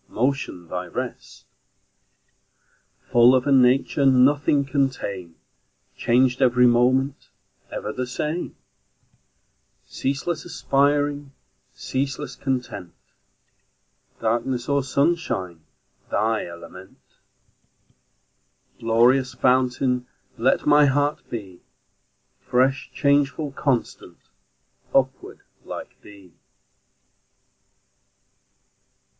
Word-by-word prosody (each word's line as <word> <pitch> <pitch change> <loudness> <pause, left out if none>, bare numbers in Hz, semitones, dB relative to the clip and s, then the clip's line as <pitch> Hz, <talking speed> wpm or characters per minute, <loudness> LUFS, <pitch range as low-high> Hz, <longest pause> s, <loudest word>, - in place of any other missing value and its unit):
Motion 125 -8 -2
thy 90 +1 -5
rest; - - -7 1.7
Full 120 +2 +6
of 130 - +1
a 145 - +1
nature 130 +2 +3
Nothing 140 +2 +4
can 135 0 +1
tame, 95 -9 -7 0.6
Changed 125 +2 +2
every 125 -1 +4
moment, 130 +3 +2 0.4
Ever 105 - -5
the 125 0 -3
same; 150 +7 -4 1.3
Ceaseless 135 - -3
aspiring, 145 -2 0 0.4
Ceaseless 135 0 -4
content, 125 -9 -4 1.2
Darkness 120 +2 -1
or 140 0 +2
sunshine 130 - -1 0.5
Thy 110 -2 0
element; 85 +2 -12 1.8
Glorious 125 +3 +3
fountain. 125 0 +1 0.3
Let 130 +4 +1
my 150 0 +6
heart 145 +2 +1
be 95 -6 -7 0.8
Fresh, 130 +2 0
changeful, 140 +1 +1
constant, 135 -3 -2 0.8
Upward, 130 -1 0 0.2
like - - -9
thee! 100 -4 -16
130 Hz, 75 wpm, -23 LUFS, 120-140 Hz, 1.8 s, Full